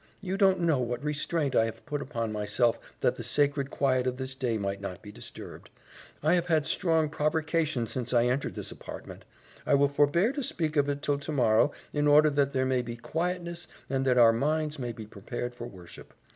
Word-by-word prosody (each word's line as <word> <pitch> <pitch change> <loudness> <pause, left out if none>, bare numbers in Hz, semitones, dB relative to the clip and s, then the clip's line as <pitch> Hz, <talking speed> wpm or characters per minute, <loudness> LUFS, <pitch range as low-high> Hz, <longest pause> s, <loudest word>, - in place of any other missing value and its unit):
You 190 -1 -3
don't 190 -2 +3
know 160 -5 +2
what 120 +1 -2
restraint 150 -1 -1
I 115 - +5
have 115 - -7
put 145 -1 -3
upon 115 -5 -3
myself 110 +3 +1 0.2
that - - +2
the - - -5
sacred 145 -1 +1
quiet 130 -3 +1
of 125 0 -1
this 130 0 -3
day 125 -4 -1
might 100 -1 -3
not 95 -3 -6
be 105 - -9
disturbed. - - -9 0.5
I 155 +3 +4
have 175 -1 +1
had 160 -3 +2
strong 160 -2 +2
provercation 155 -3 0
since 125 +2 -4
I 120 -1 +4
entered 125 +3 -1
this - - -5
apartment. - - -9 0.4
I - - +3
will 140 0 +4
forbear 145 - +3
to 285 - -3
speak 160 - -2
of 145 -1 +2
it 145 0 -3
till 145 -1 +1
tomorrow 140 -3 +2 0.2
in 145 0 +1
order 150 +1 +6
that 140 -1 +2
there 130 -1 +1
may 130 -1 +1
be 120 -1 -6
quietness 170 +6 -3 0.2
and 135 -1 +1
that 125 -1 +3
our 115 -2 +7
minds 150 +4 0
may 120 -2 -3
be 110 -1 -8
prepared 120 +4 -6
for 120 -1 -7
worship. 90 -6 -13
140 Hz, 205 wpm, -28 LUFS, 120-155 Hz, 0.5 s, our